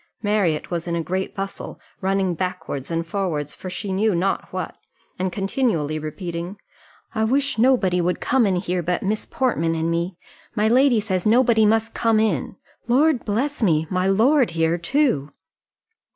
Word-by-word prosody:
Marriott 200 Hz, -8 st, 0 dB
was 170 Hz, 0 st, -3 dB
in 170 Hz, -, -1 dB
a 165 Hz, -, -1 dB
great 185 Hz, +3 st, -3 dB
bustle, 195 Hz, 0 st, -5 dB, 0.2 s
running 190 Hz, -1 st, +1 dB
backwards 165 Hz, -6 st, -4 dB
and 165 Hz, 0 st, -1 dB
forwards 165 Hz, -6 st, -2 dB
for 185 Hz, -, -7 dB
she 190 Hz, +1 st, -4 dB
knew 205 Hz, +1 st, +2 dB
not 190 Hz, +3 st, -1 dB
what, -, -, -4 dB, 0.4 s
and 185 Hz, 0 st, -1 dB
continually 195 Hz, -, 0 dB
repeating, 170 Hz, +4 st, -5 dB, 0.6 s
"I 220 Hz, -, 0 dB
wish 270 Hz, +2 st, +1 dB
nobody 220 Hz, -8 st, +3 dB
would 180 Hz, +1 st, 0 dB
come 250 Hz, -4 st, +2 dB
in 190 Hz, -, +1 dB
here 180 Hz, 0 st, -1 dB
but 175 Hz, +1 st, -1 dB
Miss 210 Hz, +2 st, -1 dB
Portman 165 Hz, -11 st, 0 dB
and 165 Hz, +1 st, -1 dB
me. 170 Hz, +2 st, -2 dB, 0.4 s
My 215 Hz, -1 st, +2 dB
lady 250 Hz, 0 st, +4 dB
says 190 Hz, -2 st, -1 dB
nobody 230 Hz, -1 st, +4 dB
must 225 Hz, +1 st, +1 dB
come 225 Hz, -2 st, +2 dB
in. 200 Hz, -, 0 dB, 0.3 s
Lord 270 Hz, +2 st, +3 dB
bless 255 Hz, +8 st, -1 dB
me! 160 Hz, -7 st, +3 dB
my 185 Hz, 0 st, +1 dB
lord 245 Hz, +7 st, +4 dB
here 165 Hz, +1 st, +2 dB
too!" 170 Hz, -, +1 dB
190 Hz, 165 wpm, -22 LUFS, 170-225 Hz, 0.6 s, lady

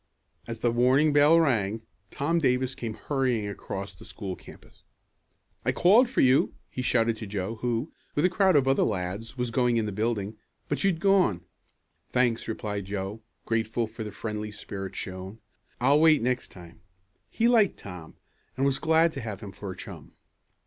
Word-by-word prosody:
As 115 Hz, -1 st, -4 dB
the 120 Hz, -, +2 dB
warning 130 Hz, +6 st, +3 dB
bell 145 Hz, +3 st, +6 dB
rang, 115 Hz, -8 st, +1 dB, 0.3 s
Tom 160 Hz, +4 st, 0 dB
Davis 130 Hz, -3 st, +1 dB
came 115 Hz, -4 st, -5 dB
hurrying 130 Hz, -7 st, -1 dB
across 100 Hz, -1 st, -6 dB
the 90 Hz, -, -15 dB
school 95 Hz, -4 st, -6 dB
campus. -, -, -16 dB, 0.8 s
"I -, -, +2 dB
called 220 Hz, +8 st, +5 dB
for 255 Hz, -, +1 dB
you!" 130 Hz, +1 st, +4 dB, 0.2 s
he 130 Hz, -, -4 dB
shouted 115 Hz, -2 st, +2 dB
to 110 Hz, -, -7 dB
Joe 100 Hz, +2 st, -3 dB
who, 120 Hz, +4 st, -2 dB, 0.2 s
with 150 Hz, -, +2 dB
a -, -, +7 dB
crowd 190 Hz, -1 st, +3 dB
of 135 Hz, -2 st, +4 dB
other 135 Hz, -, +3 dB
lads, 100 Hz, +4 st, -2 dB
was 125 Hz, -1 st, -1 dB
going 120 Hz, -1 st, +2 dB
in 110 Hz, -, +1 dB
the 105 Hz, -, -3 dB
building, 105 Hz, 0 st, -2 dB, 0.3 s
"but 145 Hz, -, -1 dB
you'd 190 Hz, -4 st, +2 dB
gone." 190 Hz, -, +3 dB, 0.7 s
"Thanks," 125 Hz, -2 st, +1 dB
replied 105 Hz, -3 st, -4 dB
Joe, 100 Hz, +2 st, -4 dB, 0.2 s
grateful 115 Hz, +1 st, 0 dB
for 110 Hz, +1 st, -7 dB
the 105 Hz, -, -5 dB
friendly 105 Hz, -1 st, -4 dB
spirit 100 Hz, -2 st, -7 dB
shown. 95 Hz, +3 st, -6 dB, 0.4 s
"I'll 140 Hz, +4 st, +4 dB
wait 155 Hz, -5 st, +5 dB
next 125 Hz, +1 st, 0 dB
time." 85 Hz, -2 st, -13 dB, 0.5 s
He 230 Hz, -, +1 dB
liked 225 Hz, -5 st, +4 dB
Tom, 90 Hz, -5 st, -10 dB, 0.4 s
and 135 Hz, -, +1 dB
was 135 Hz, -1 st, +2 dB
glad 160 Hz, +1 st, +3 dB
to 135 Hz, -, -6 dB
have 110 Hz, -3 st, -6 dB
him 100 Hz, -3 st, -7 dB
for 100 Hz, 0 st, -8 dB
a -, -, -9 dB
chum. -, -, -10 dB
115 Hz, 175 wpm, -27 LUFS, 105-140 Hz, 0.8 s, a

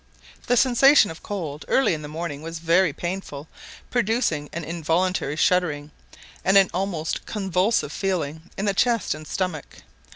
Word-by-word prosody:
The 245 Hz, -, +3 dB
sensation 260 Hz, -, +5 dB
of 160 Hz, -, -11 dB
cold 160 Hz, -8 st, -5 dB
early 265 Hz, -8 st, +3 dB
in 155 Hz, -, -4 dB
the 150 Hz, -, -7 dB
morning 155 Hz, -1 st, -5 dB
was 165 Hz, +1 st, -6 dB
very 170 Hz, +2 st, +3 dB
painful, 170 Hz, -3 st, -5 dB, 0.4 s
producing 225 Hz, -11 st, 0 dB
an 170 Hz, -, -5 dB
involuntary 165 Hz, 0 st, -1 dB
shuddering, 155 Hz, -3 st, +1 dB, 0.5 s
and 190 Hz, +1 st, +4 dB
an 195 Hz, -2 st, +5 dB
almost 180 Hz, -4 st, -2 dB
convulsive 195 Hz, +1 st, 0 dB
feeling 165 Hz, -4 st, -3 dB
in 200 Hz, -, -2 dB
the 200 Hz, -, +1 dB
chest 235 Hz, +2 st, +1 dB
and 155 Hz, 0 st, -10 dB
stomach. 180 Hz, -, -4 dB
175 Hz, 150 wpm, -24 LUFS, 155-195 Hz, 0.5 s, sensation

